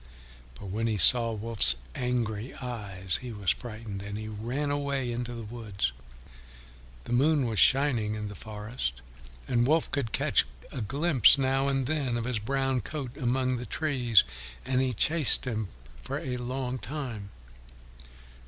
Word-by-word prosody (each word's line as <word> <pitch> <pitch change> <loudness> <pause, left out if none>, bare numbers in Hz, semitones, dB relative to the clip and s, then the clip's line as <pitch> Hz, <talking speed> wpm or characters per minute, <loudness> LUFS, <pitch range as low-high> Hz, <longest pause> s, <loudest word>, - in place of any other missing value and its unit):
But 95 +9 -9
when 115 +3 -1
he 110 -2 0
saw 115 +4 +6
Wolf's 110 - +4 0.2
angry 120 -2 -2
eyes 100 -8 -4
he 125 -1 -6
was 100 -6 0
frightened, 110 -4 -6
and 100 +1 -6
he 110 0 -6
ran 120 +7 -3
away 140 -3 -1
into 120 0 -4
the 115 - -6
woods. 105 - -3 1.1
The - - -5
moon 145 +2 +3
was 110 -3 +1
shining 125 -6 +4
in 105 -1 -4
the 100 - -7
forest, 105 - -5 0.4
and 120 0 +2
Wolf 160 +2 +2
could 130 -6 -1
catch - - +2 0.2
a 125 - -4
glimpse 135 - +4
now 135 0 +1
and 135 -1 0
then 135 -4 -1
of 115 - -3
his 125 -3 -1
brown 135 +3 0
coat 135 +1 -6
among 130 -1 0
the 120 0 -6
trees, 125 -7 +3 0.4
and 130 0 +1
he 130 -1 +1
chased 150 +5 +4
him 110 -4 -2 0.3
for - - -4
a 125 -1 -4
long 125 +1 -3
time. 125 -9 -6
120 Hz, 155 wpm, -28 LUFS, 110-135 Hz, 1.1 s, saw